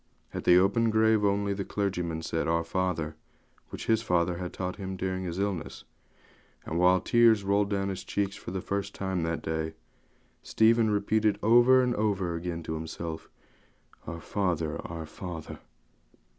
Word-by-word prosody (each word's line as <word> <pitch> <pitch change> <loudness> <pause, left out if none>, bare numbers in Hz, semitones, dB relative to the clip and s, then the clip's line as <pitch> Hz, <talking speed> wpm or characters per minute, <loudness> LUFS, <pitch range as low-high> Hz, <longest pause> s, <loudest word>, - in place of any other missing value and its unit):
At - - -5
the 90 - +7
open 100 +5 +3
grave 110 -1 +3
only, 100 0 +1
the 100 0 -3
clergyman 90 -6 -2
said 80 - -2
'Our 85 0 +1
Father,' 85 -5 -2 0.5
which - - -7
his 110 0 +2
father 90 -4 +1
had 90 0 -5
taught 90 0 -4
him 95 -1 -5
during 95 0 -2
his 85 0 -4
illness; 100 -3 -3 0.8
and 85 - -2
while 90 +1 +5
his - - -15
tears 115 -3 +5
rolled 100 +1 +2
down 100 -1 -1
his 95 -1 -5
cheeks 100 0 -2
for - - -8
the 95 +1 -3
first 100 +1 -3
time 95 -2 -2
that 80 0 -2
day, 80 0 -3 0.7
Stephen 110 0 +3
repeated 105 0 +1
over 120 +4 +6
and 125 -1 +1
over 100 -5 0
again 85 0 -4
to 80 - -4
himself, 80 0 -6 0.8
'Our 85 +1 -6
Father! 85 -6 -1
our 80 -1 -6
Father!' 85 0 -8
95 Hz, 165 wpm, -28 LUFS, 85-105 Hz, 0.8 s, the